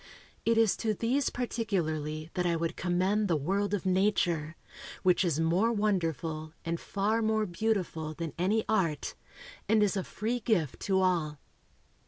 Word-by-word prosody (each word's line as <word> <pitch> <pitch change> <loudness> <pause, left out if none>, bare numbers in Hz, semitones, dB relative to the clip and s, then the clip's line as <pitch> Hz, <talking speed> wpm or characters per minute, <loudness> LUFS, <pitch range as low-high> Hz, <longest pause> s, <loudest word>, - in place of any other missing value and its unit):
It 230 0 +3
is 225 -3 +4
to 220 -2 0
these 250 +6 +1
particularly 160 -10 -2
that 180 -1 0
I 170 - +2
would 165 +1 -2
commend 185 +4 +1
the 170 - +2
world 195 +7 0
of 195 - -5
nature, 180 -5 +1 0.5
which 185 0 +4
is 165 -4 +1
more 175 +8 +2
wonderful 165 - -1
and 170 0 -2
far 215 +3 0
more 220 -1 +1
beautiful 175 -5 -2
than 165 -3 -4
any 205 +6 +1
art, 175 -9 0 0.6
and 220 -1 +5
is 205 0 +1
a 190 - -1
free 230 +7 -2
gift 190 - 0
to 190 -1 +4
all. 165 -5 +1
185 Hz, 155 wpm, -30 LUFS, 165-215 Hz, 0.6 s, and